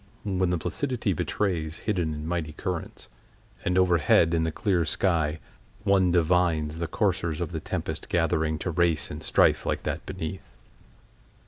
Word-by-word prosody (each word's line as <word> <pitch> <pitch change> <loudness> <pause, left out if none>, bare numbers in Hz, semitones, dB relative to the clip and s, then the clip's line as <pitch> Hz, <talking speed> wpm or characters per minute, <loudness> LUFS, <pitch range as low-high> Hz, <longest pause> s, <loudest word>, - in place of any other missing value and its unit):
When 95 -3 0
the 90 - +1
placidity 120 - -1
betrays 80 -3 -1
hidden 90 -8 0
and 75 +1 -6
mighty 80 -3 -2
currents, 90 +1 -5 0.6
and 90 +1 +1
overhead, 85 -2 +4
in 80 -1 +2
the 80 - -1
clear 90 0 +1
sky, 80 -4 +1 0.4
one 95 -3 +3
divines 85 -2 +2
the 85 - -2
coursers 80 0 0
of 85 -1 -3
the 80 - -3
tempest - - -4
gathering 80 -2 +1
to 90 - 0
race 85 -1 +1
in 75 - -6
strife - - +3
like - - -2
that - - -3
beneath. 90 +3 -6
85 Hz, 150 wpm, -27 LUFS, 80-90 Hz, 0.6 s, overhead